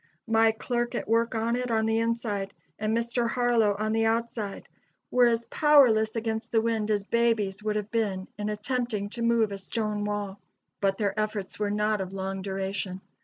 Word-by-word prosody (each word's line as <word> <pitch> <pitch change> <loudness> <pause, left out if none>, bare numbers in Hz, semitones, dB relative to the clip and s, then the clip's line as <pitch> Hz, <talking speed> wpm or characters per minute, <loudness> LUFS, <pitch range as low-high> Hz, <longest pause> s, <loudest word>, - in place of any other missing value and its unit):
My 225 0 +4
clerk 240 +2 -2
at - - -3
work 230 +1 +2
on 225 +1 0
it 250 0 -2
on 220 -1 +1
the 225 0 +2
inside 225 -4 -2 0.2
and 215 +2 0
Mr. 235 0 0
Harlow 235 -4 +2
on 215 +1 -1
the 225 0 +2
outside, 225 -3 -2 0.4
were 250 -1 +5
as 230 0 +1
powerless 245 -8 +4
against 225 0 -3
the 225 - +4
wind 220 -1 0
as 205 -2 +1
babies 215 -3 +1
would 210 0 -1
have 210 0 -3
been 200 -5 -1
in 210 0 -3
attempting 215 -1 -2
to 235 - -5
move 230 -2 +2
a 200 - -4
stone 210 +1 -2
wall. 205 -1 -3 0.4
"But 195 -1 +1
their 200 -2 0
efforts 210 -3 -3
were 210 -1 0
not 210 0 +1
of 190 0 -5
long 195 0 -3
duration. 190 -1 -3
220 Hz, 185 wpm, -27 LUFS, 205-230 Hz, 0.4 s, were